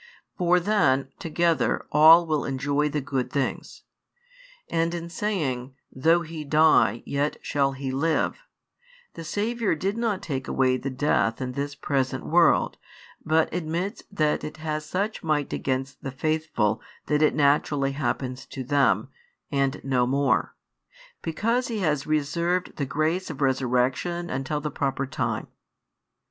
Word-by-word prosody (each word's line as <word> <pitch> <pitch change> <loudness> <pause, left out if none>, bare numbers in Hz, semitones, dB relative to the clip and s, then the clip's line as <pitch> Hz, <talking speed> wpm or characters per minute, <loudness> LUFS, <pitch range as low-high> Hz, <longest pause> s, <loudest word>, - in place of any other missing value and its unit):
For 180 0 +3
then, 140 -9 +2
together, 165 0 +1
all 160 +3 +8
will 155 -3 0
enjoy 140 +2 0
the 150 0 -2
good 130 -1 -2
things. 140 -2 -3 0.8
And 165 +1 0
in 170 0 -5
saying: 140 -11 -2 0.2
Though 165 +6 +3
he 155 -1 -7
die, 150 -7 +4
yet 140 +1 -1
shall 140 -1 +1
he 135 0 -4
live, 155 - 0 0.7
the 165 - -8
Saviour 210 +3 -1
did 195 +7 -2
not 225 -5 -1
take 135 -4 -4
away 130 -1 +2
the 135 - -4
death 130 -4 +1
in 130 -1 -3
this 140 +2 -4
present 130 -1 -1
world: 170 0 +3 0.5
but 160 0 +2
admits 175 +5 -3
that 155 -6 0
it 150 +1 -6
has 155 -1 -4
such 200 +6 -2
might 150 -3 -1
against 135 +1 -2
the 135 - -4
faithful 140 -6 -1 0.2
that 150 0 +1
it 155 - +3
naturally 140 -1 +2
happens 130 -1 -3
to 130 - -6
them, 125 -5 +2 0.4
and 140 0 0
no 125 -2 +1
more; 140 +1 +1 0.7
because 230 +10 0
He 230 - -3
has 150 -4 0
reserved 170 +4 0
the 140 - -2
grace 160 +6 -1
of 150 -4 -7
resurrection 135 +6 0
until 135 +3 -2
the 150 0 -3
proper 140 0 -1
time. 135 - -2
150 Hz, 140 wpm, -25 LUFS, 135-165 Hz, 0.8 s, all